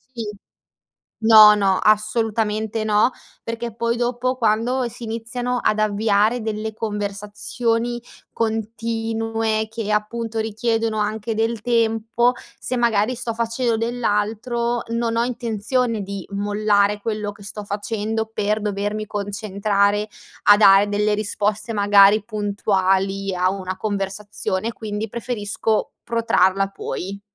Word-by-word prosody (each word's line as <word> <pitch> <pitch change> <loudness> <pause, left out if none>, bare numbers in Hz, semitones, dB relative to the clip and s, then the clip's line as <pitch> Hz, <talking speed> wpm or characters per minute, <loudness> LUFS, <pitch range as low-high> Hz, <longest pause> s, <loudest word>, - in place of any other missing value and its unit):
Sì. 225 -2 -4 1.0
No, 215 -1 +9
no, 195 -2 +2
assolutamente 215 0 +1
no, 215 +3 +3 0.3
perché 230 0 -5
poi 235 0 0
dopo 245 +1 -1
quando 240 +3 +1
si 235 - -11
iniziano 240 +2 -3
ad 215 - +1
avviare 215 +2 +2
delle 220 0 -3
conversazioni 220 +3 -2 0.3
continue 225 0 -1
che, 225 -2 -4
appunto, 225 +1 -2
richiedono 225 0 -1
anche 215 +1 -2
del 225 0 -1
tempo 230 +1 +1 0.2
se 255 - -3
magari 235 -1 +2
sto 230 -2 -4
facendo 230 0 0
dell'altro, 235 +1 -1
non 230 0 -1
ho 230 - +2
intenzione 235 -1 -1
di 195 -1 -6
mollare 205 0 +1
quello 210 -1 -3
che 205 -1 -15
sto 210 +1 -6
facendo 220 +2 -2
per 210 +1 0
dovermi 205 +1 -2
concentrare 205 0 0 0.4
a 205 0 +8
dare 200 0 +6
delle 210 +1 +1
risposte 210 +1 -1
magari 205 0 +5
puntuali 195 -2 0
a 180 +1 +2
una 185 -1 -5
conversazione, 205 +1 -2
quindi 215 0 -4
preferisco 220 -2 -2
protrarla 195 -4 +2
poi. 195 0 -6
215 Hz, 115 wpm, -21 LUFS, 205-230 Hz, 1.0 s, No